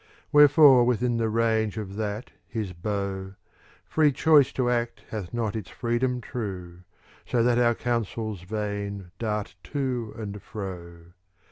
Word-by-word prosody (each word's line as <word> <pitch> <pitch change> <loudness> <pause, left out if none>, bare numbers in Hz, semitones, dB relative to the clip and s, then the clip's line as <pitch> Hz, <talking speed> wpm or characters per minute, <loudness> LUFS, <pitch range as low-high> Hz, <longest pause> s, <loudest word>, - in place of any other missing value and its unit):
Wherefore 145 -3 +7
within 120 0 +1
the 115 -1 0
range 110 -1 +1
of 100 -3 -5
that 105 +2 -4 0.2
his 105 -5 -4
bow, 95 +1 -4 0.5
Free 155 -2 +3
choice 145 0 +5
to 130 -2 0
act 120 -1 -1
hath 100 -6 -5
not 115 -3 -2
its 110 -4 -5
freedom 125 +1 -1
true, 95 -7 -6 0.2
'" - - -28
So 120 -2 +2
that 120 0 +3
our 120 -1 +3
counsels 110 -4 -2
vain 100 -1 -4
dart 105 -2 -2
to 125 - -3
and 105 -2 -6
fro. 85 -4 -8
110 Hz, 140 wpm, -26 LUFS, 100-120 Hz, 0.5 s, Wherefore